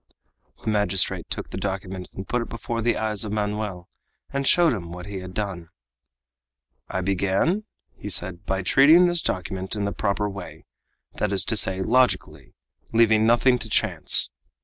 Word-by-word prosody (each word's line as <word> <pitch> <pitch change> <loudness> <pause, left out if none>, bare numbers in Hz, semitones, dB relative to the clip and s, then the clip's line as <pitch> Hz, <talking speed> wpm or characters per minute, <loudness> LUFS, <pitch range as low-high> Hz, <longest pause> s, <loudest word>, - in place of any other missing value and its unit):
The 110 - -1
magistrate 105 -3 +1
took - - -5
the - - -5
document 95 -1 -5
and 95 - -8
put 125 - 0
it 115 - -6
before 115 0 -4
the 120 +1 +1
eyes 110 -1 0
of 105 - -5
Manoel 105 -4 -3 0.5
and 140 0 -1
showed 175 -4 +4
him 85 -6 -6
what 90 0 -8
he 100 -1 -6
had 90 0 -9
done. 95 -5 -4 1.2
"I 95 - -2
began," 100 - 0 0.3
he 105 - -8
said, 90 0 +1
"by 95 0 -1
treating 155 - +6
this 175 -2 +1
document 95 +1 -3
in 105 -1 -2
the 100 - -1
proper 105 0 -1
way, 100 -3 -9 0.5
that 105 - -1
is 100 -2 +2
to 110 - 0
say, 95 -2 0
logically, 90 - 0 0.4
leaving 110 -1 +4
nothing 125 +2 +4
to 110 - -8
chance. - - +3
100 Hz, 170 wpm, -24 LUFS, 95-115 Hz, 1.2 s, treating